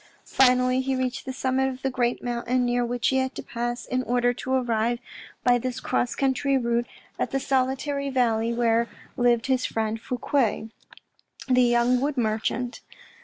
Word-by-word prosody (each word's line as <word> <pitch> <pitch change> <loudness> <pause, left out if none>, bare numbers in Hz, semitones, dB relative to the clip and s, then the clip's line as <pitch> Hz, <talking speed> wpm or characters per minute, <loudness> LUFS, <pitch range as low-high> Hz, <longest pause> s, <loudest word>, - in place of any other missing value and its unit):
Finally, 255 0 +3
he 265 0 -1
reached 255 -1 -2
the - - -2
summit 265 0 0
of 260 0 -8
the 270 - 0
great 245 -1 -1
mountain, 245 +1 0
near 245 0 +1
which 240 0 0
he 265 - +1
had 260 0 -1
to - - -6
pass 240 +1 -4
in 255 0 -1
order 245 0 +1
to 260 +1 -6
arrive 240 -2 +1 0.5
by 245 -1 +4
this 255 +1 -3
cross 245 - -1
country 275 0 +1
route 235 -1 0 0.3
at - - 0
the 270 - -1
solitary 270 +1 0
valley 230 -3 +1
where 235 0 +1 0.3
lived 240 -2 +2
his 260 -1 +1
friend 220 0 -2
Fouque, 240 -3 -1 0.8
the 255 -1 +4
young 240 +1 +3
wood 285 0 -1
merchant. 230 +2 -1
250 Hz, 170 wpm, -25 LUFS, 240-260 Hz, 0.8 s, by